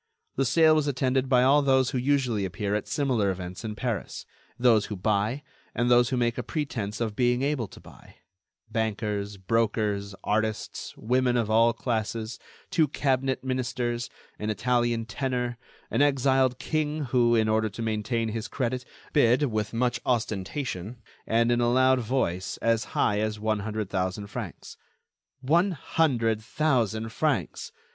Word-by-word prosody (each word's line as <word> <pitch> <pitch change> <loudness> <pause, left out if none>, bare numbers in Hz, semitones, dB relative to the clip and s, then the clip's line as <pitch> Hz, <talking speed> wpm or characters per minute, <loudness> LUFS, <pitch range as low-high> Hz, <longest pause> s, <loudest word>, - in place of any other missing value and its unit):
The 135 - +1
sale 160 +5 +5
was 155 -2 +2
attended 130 -1 0
by 125 -1 +5
all 140 +3 +5
those 130 -2 +3
who 130 - -1
usually 125 -5 +1
appear 95 +2 -2
at 105 - -1
similar 125 -8 +1
events 90 +1 -5
in 110 -1 -4
Paris; 115 -1 -4 0.3
those 120 -4 +4
who 105 - -4
buy, 105 +7 0 0.3
and 120 +1 +1
those 120 0 +5
who 130 - -1
make 120 -1 0
a - - 0
pretense 115 -9 -3
of 110 -3 -2
being 125 +1 +2
able 140 -6 0
to - - -14
buy; - - -16 0.5
bankers, 105 -2 -2
brokers, 105 -1 0
artists, 110 +1 -2
women 125 +1 +1
of 110 -2 0
all 115 +2 +5
classes, 115 -1 -3 0.3
two 165 -5 +3
cabinet 135 -1 0
ministers, 125 -2 -2 0.3
an 105 - -3
Italian 120 0 +1
tenor, 125 0 -2 0.3
an - - +1
exiled 135 -2 +3
king 155 0 -1
who, 120 -2 +3
in 110 -1 +3
order 110 0 +2
to 105 +3 -8
maintain 110 +1 -1
his 110 0 -4
credit, 125 -1 -2 0.3
bid, 130 -1 +3
with 110 -1 -1
much 120 0 0
ostentation, 110 -1 -2 0.3
and 115 +1 +3
in 120 0 +2
a 120 0 +2
loud 130 +1 +4
voice, 105 -7 -1
as 115 -1 +1
high 105 0 +2
as 110 0 -2
one 110 0 0
hundred 105 -1 -4
thousand 95 +2 -2
francs. 100 - -7 0.6
One 170 +8 +3
hundred 120 -8 +1
thousand 115 -5 0
francs! 110 - -1
120 Hz, 155 wpm, -27 LUFS, 110-130 Hz, 0.6 s, sale